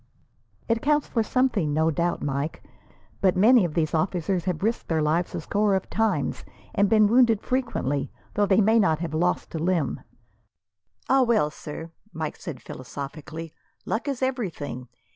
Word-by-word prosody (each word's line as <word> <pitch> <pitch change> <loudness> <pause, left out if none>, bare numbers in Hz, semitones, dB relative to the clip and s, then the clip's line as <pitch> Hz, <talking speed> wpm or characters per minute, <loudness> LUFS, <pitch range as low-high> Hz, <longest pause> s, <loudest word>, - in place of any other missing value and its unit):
"It 230 0 +1
counts 295 0 +2
for 230 - 0
something, 220 - +1
no 160 +1 +3
doubt, 170 +3 -1
Mike, 140 +2 -3 0.6
but 190 -3 +3
many 230 +3 +6
of 170 -4 -2
these 155 -3 0
officers 175 +1 0
have 180 -2 -2
risked 225 +2 -1
their 160 -1 +1
lives 165 +3 0
a - - -3
score 205 +4 +1
of 190 - -3
times, 225 -1 0 0.3
and 200 -1 +3
been 215 0 +5
wounded 230 -1 +4
frequently, 230 - -1 0.2
though 205 0 +2
they 195 +2 +4
may 220 +3 +4
not 175 -7 +3
have 165 -1 -4
lost 175 +3 0
a 165 - -2
limb." 170 -3 0 1.1
"Ah 270 0 +4
well, 225 -12 +2
sir!" 160 +2 -8 0.2
Mike 155 -1 -4
said, 160 -9 -8
philosophically, 150 +5 -7 0.3
"Luck 225 +6 -2
is 270 -2 -2
everything. 170 - -3
180 Hz, 160 wpm, -25 LUFS, 155-225 Hz, 1.1 s, many